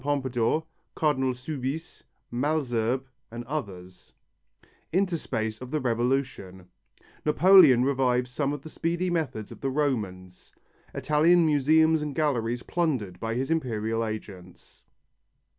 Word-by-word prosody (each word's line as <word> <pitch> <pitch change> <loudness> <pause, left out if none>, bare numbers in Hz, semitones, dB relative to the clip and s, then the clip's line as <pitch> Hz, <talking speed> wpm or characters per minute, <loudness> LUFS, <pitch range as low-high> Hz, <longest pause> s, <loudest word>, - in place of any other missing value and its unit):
Pompadour, 135 +1 0 0.3
Cardinal 135 -5 +1
Soubise, 135 +4 -5 0.3
Malesherbes 130 -3 0 0.3
and 120 +1 -7
others 95 -10 -7 0.8
Interspace 135 - -1
of 130 - -7
the 155 - -1
Revolution 120 -7 -2 0.6
Napoleon 150 -5 +6
revives 125 -2 +1
some 140 +2 -1
of 145 -1 -5
the 155 - -9
speedy 175 +2 -1
methods 150 -11 -3
of - - -11
the 135 - -1
Romans 105 -11 -3 0.4
Italian 165 +3 +3
museums 160 +2 +3
and 150 -2 -4
galleries 125 -6 0
plundered 130 - -2
by 115 0 -3
his 135 +5 -2
Imperial 115 -7 -1
agents. 100 -5 -8
130 Hz, 110 wpm, -27 LUFS, 115-155 Hz, 0.8 s, Napoleon